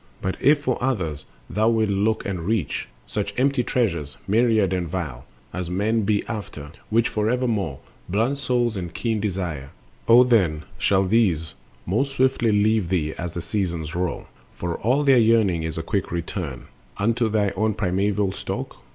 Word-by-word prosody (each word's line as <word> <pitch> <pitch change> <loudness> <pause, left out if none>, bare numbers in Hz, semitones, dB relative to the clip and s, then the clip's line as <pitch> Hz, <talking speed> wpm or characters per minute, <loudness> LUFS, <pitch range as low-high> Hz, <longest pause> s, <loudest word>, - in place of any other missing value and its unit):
But 95 - -2
if 145 +2 +5
for 130 -3 -1
others 90 - -1 0.2
thou 110 +4 +2
wilt 110 -2 +2
look 105 +3 +1
and 95 -3 -2
reach— 95 - -1 0.2
Such 100 -1 -3
empty 135 0 +2
treasures, 85 - -1
myriad 110 -3 +3
and 90 -2 -1
vile, 75 -9 -4 0.3
As 90 -1 -4
men 105 +4 +1
be 105 0 +1
after, 90 -10 -6 0.2
which 115 +2 +3
forevermore 110 - 0 0.3
Blunt 115 +9 +1
soul 120 -4 +1
and 90 -3 -4
keen 115 +2 -1
desire—O 95 - +1
then 95 -11 +2 0.2
shall 95 -1 +3
these 90 -7 +2 0.3
Most 135 +9 0
swiftly 130 -4 +2
leave 105 -2 +2
thee 80 -4 0
as 90 -1 -4
the 85 - -3
seasons 85 -4 -2
roll; 90 0 -2 0.3
For 85 -1 -3
all 130 +7 +2
their 135 -3 +6
yearning 110 -7 +3
is 80 0 -4
a 80 - -2
quick 95 +3 -2
return 85 -6 -4 0.3
Unto 115 +2 +1
their 105 -2 +1
own 110 +1 +1
primeval 100 0 0
stock. - - -5
100 Hz, 160 wpm, -23 LUFS, 85-115 Hz, 0.3 s, their